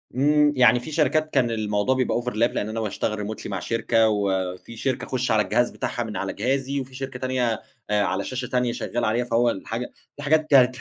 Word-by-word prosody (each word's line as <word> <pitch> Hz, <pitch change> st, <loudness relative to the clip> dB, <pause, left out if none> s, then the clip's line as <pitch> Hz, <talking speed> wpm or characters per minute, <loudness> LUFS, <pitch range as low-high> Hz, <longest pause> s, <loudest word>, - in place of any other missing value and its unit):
إمم. 150 Hz, +2 st, +4 dB
يعني 125 Hz, -1 st, +5 dB
في 140 Hz, +6 st, -8 dB
شركات 155 Hz, 0 st, +2 dB
كان 125 Hz, -4 st, +2 dB
الموضوع 105 Hz, +2 st, 0 dB
بيبقى 130 Hz, -2 st, 0 dB
overlap، 125 Hz, -, -2 dB, 0.3 s
لإن 105 Hz, -, -1 dB
أنا 110 Hz, +1 st, -3 dB
باشتغل 105 Hz, 0 st, -2 dB
remotely 110 Hz, -, -6 dB
مع 100 Hz, -2 st, -3 dB
شركة 115 Hz, +2 st, +2 dB
وفي 95 Hz, 0 st, -2 dB
شركة 130 Hz, 0 st, -1 dB
أخُش 125 Hz, -2 st, -1 dB
على 110 Hz, -1 st, +4 dB
الجهاز 115 Hz, +5 st, +1 dB
بتاعها 120 Hz, -, -3 dB
من 110 Hz, -4 st, -5 dB
على 95 Hz, -, -3 dB
جهازي 135 Hz, +5 st, -1 dB
وفي 130 Hz, -1 st, -7 dB
شركة 135 Hz, -1 st, -6 dB
تانية، 125 Hz, -3 st, 0 dB, 0.3 s
آآ 105 Hz, -1 st, +2 dB
على 100 Hz, 0 st, -1 dB
شاشة 130 Hz, +2 st, -4 dB
تانية 125 Hz, -1 st, 0 dB
شغّال 120 Hz, 0 st, -2 dB
عليها 115 Hz, +3 st, +1 dB
فهو 120 Hz, 0 st, +2 dB
الحاجة 115 Hz, +4 st, -4 dB, 0.3 s
الحاجات 155 Hz, +2 st, +2 dB
كانت 130 Hz, -3 st, +6 dB
120 Hz, 200 wpm, -24 LUFS, 110-130 Hz, 0.3 s, كانت